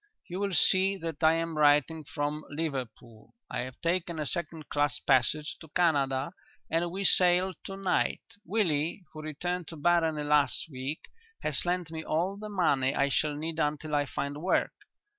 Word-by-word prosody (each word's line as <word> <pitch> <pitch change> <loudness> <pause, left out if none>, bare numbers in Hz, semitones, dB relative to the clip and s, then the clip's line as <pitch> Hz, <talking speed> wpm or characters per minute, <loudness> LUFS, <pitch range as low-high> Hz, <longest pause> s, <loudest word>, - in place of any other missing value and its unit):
"You 180 +2 -5
will 200 -2 -1
see 190 +4 +4
that 165 -3 -6
I 160 0 +6
am 165 -1 -2
writing 150 +2 +4
from 150 0 -3
Liverpool. 130 -7 -6 0.2
I - - -2
have 130 0 -5
taken 170 0 -1
a 150 - -2
second 160 0 -3
class 145 -1 +1
passage 150 +5 +1
to 160 - -11
Canada 140 -4 +2 0.4
and 170 +2 +1
we 190 +3 -4
sail 180 0 +4
to 195 - -6
night. 195 -2 0 0.2
Willie, 170 -4 0
who 155 - -7
returned 175 +3 -3
to 165 - -8
Barony 160 -1 +2
last 145 -2 +2
week, 135 +4 -4 0.4
has 150 +1 +2
lent 175 -2 -1
me 160 -1 -5
all 175 +6 0
the 210 +1 -7
money 140 -9 +2
I 140 0 +2
shall 150 +1 +1
need 160 +2 -4
until 150 0 -1
I 145 -1 +2
find 145 +2 -4
work. 185 - +1
160 Hz, 170 wpm, -29 LUFS, 145-175 Hz, 0.4 s, I